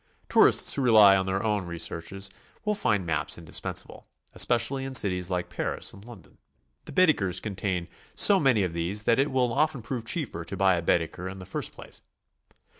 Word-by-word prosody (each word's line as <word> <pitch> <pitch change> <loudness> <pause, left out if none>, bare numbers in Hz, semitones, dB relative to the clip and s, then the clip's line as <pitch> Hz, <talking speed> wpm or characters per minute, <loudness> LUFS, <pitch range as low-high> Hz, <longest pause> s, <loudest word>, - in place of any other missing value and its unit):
Tourists - - +5
who 140 - -1
rely 110 -6 +6
on 95 -1 -1
their 95 +1 -2
own 105 -4 -1
researches 85 +3 -2 0.3
will 210 - +1
find 105 - -1
maps 80 - -1
indispensable, 80 -2 -5 0.3
especially 120 +3 0
in 135 0 -4
cities 90 -5 +2
like 90 -2 -2
Paris - - -2
and 100 - -14
Lon 115 -6 -13
don. 75 - -25 0.5
The - - -10
Baedekers 130 - +2
contain 95 -4 -4 0.3
so 200 -2 +6
many 130 - +2
of 90 -3 -3
these 90 +5 -2
that 115 +3 +2
it 140 +2 +1
will 125 -3 0
often 150 -3 0
prove 120 -1 -5
cheaper 115 - -2
to 95 - -8
buy 95 -1 +3
a 85 - -1
Baedeker 85 +2 -1
in 95 - -9
the 95 - -10
first - - -5
place. - - -13
100 Hz, 190 wpm, -26 LUFS, 90-125 Hz, 0.5 s, rely